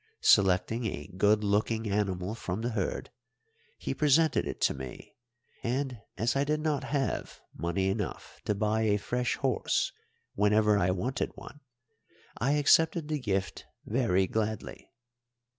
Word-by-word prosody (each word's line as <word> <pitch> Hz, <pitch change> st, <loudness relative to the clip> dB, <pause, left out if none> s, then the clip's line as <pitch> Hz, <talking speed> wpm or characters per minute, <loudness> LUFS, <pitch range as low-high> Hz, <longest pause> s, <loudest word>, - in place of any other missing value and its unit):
Selecting 100 Hz, +5 st, +4 dB
a 75 Hz, -8 st, -6 dB
good 105 Hz, +2 st, +3 dB
looking 110 Hz, +2 st, +1 dB
animal 100 Hz, -1 st, -1 dB
from 105 Hz, -3 st, -4 dB
the 120 Hz, +2 st, -1 dB
herd, 105 Hz, 0 st, -3 dB, 0.7 s
he -, -, -3 dB
presented 155 Hz, +2 st, +3 dB
it -, -, -5 dB
to -, -, +3 dB
me, 65 Hz, -2 st, -9 dB, 0.5 s
and 130 Hz, 0 st, -2 dB, 0.2 s
as 115 Hz, +3 st, +1 dB
I 140 Hz, -, +2 dB
did 150 Hz, +1 st, 0 dB
not 155 Hz, -3 st, -1 dB
have 140 Hz, -2 st, -2 dB, 0.2 s
money 85 Hz, +4 st, -1 dB
enough 95 Hz, 0 st, -4 dB
to 105 Hz, -, +1 dB
buy 110 Hz, +2 st, +1 dB
a 105 Hz, -2 st, +3 dB
fresh 120 Hz, +5 st, -1 dB
horse 130 Hz, -4 st, 0 dB, 0.4 s
whenever 105 Hz, +1 st, +3 dB
I 95 Hz, -3 st, +2 dB
wanted 105 Hz, +9 st, -1 dB
one, 145 Hz, -, -11 dB, 0.8 s
I 135 Hz, +6 st, +2 dB
accepted 155 Hz, +2 st, +3 dB
the 155 Hz, -1 st, -1 dB
gift 100 Hz, -6 st, -2 dB, 0.2 s
very 105 Hz, -6 st, +2 dB
gladly. 110 Hz, +2 st, -3 dB
110 Hz, 140 wpm, -29 LUFS, 100-130 Hz, 0.8 s, Selecting